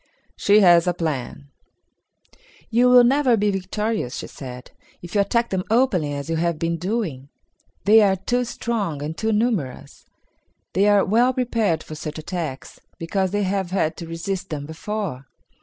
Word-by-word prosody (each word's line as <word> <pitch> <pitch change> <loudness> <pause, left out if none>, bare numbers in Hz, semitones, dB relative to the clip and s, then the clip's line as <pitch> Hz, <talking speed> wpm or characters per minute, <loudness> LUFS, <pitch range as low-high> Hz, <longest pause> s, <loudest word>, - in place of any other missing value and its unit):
She 205 +1 +4
Has 175 -2 +6
a 175 - +1
Plan. 145 -4 -4 1.2
"You 245 +2 +4
will 250 0 +8
never 255 -1 +3
be 205 0 +1
victorious," 195 - -2
she - - -5
said, 125 -2 -10 0.3
"if 175 - -9
you 205 - +3
attack 235 +4 0
them 185 -1 -1
openly 220 - +2
as 140 +1 -5
you 165 0 -1
have 170 0 0
been 165 +1 -1
doing. 170 - -3 0.6
They 220 +2 +7
are 195 -2 +4
too 245 +6 -1
strong 210 -11 -3
and 155 +2 -4
too 220 +4 -1
numerous. 210 - -2 0.7
They 195 +4 +3
are 205 -1 +4
well 240 +6 +3
prepared 225 -10 0
for - - -9
such 155 0 -6
attacks, 155 -4 -6 0.2
because 190 +3 -1
they 205 +2 -1
have 190 -1 -1
had 180 -4 0
to 170 - -7
resist 185 +3 -4
them 145 -3 -4
before." 160 -4 -5
190 Hz, 165 wpm, -22 LUFS, 160-220 Hz, 1.2 s, will